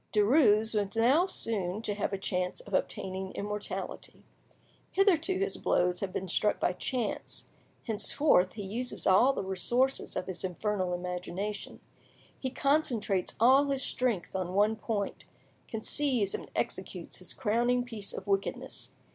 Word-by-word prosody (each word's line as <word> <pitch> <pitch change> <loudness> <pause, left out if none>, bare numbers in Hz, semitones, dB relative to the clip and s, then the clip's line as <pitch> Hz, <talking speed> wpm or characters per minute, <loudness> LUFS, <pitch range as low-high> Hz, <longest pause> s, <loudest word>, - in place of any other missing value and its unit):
Derues 220 -1 +4
was 205 -1 -1
now 265 +11 +4
soon 210 - -2
to 210 - -1
have 200 0 -2
a 195 - -1
chance 180 -1 -2
of 205 - -12
obtaining 190 0 -2
immortality. 210 0 -5 0.7
Hitherto 375 -2 +3
his 400 +2 -1
blows 180 0 +1
had 195 -2 -3
been 190 - -3
struck 210 +4 +2
by 180 - +1
chance, 230 +4 -3 0.4
henceforth 220 -2 +2
he 210 - -6
uses 235 +6 -3
all 200 +8 +6
the 265 - -3
resources 240 +8 0
of - - -2
his 185 0 -4
infernal 185 0 -1
imagination; 180 +3 -5 0.6
he 260 - -2
concentrates 250 -9 +1
all 260 +5 +6
his 275 -1 -1
strength 230 -9 -1
on 185 -1 -2
one 210 +2 +4
point—conceives 220 +2 -1
and - - -5
executes - - -3
his - - -5
crowning 240 +2 +1
piece 225 -5 -5
of - - -7
wickedness. 195 -1 -2
210 Hz, 140 wpm, -30 LUFS, 190-250 Hz, 0.7 s, all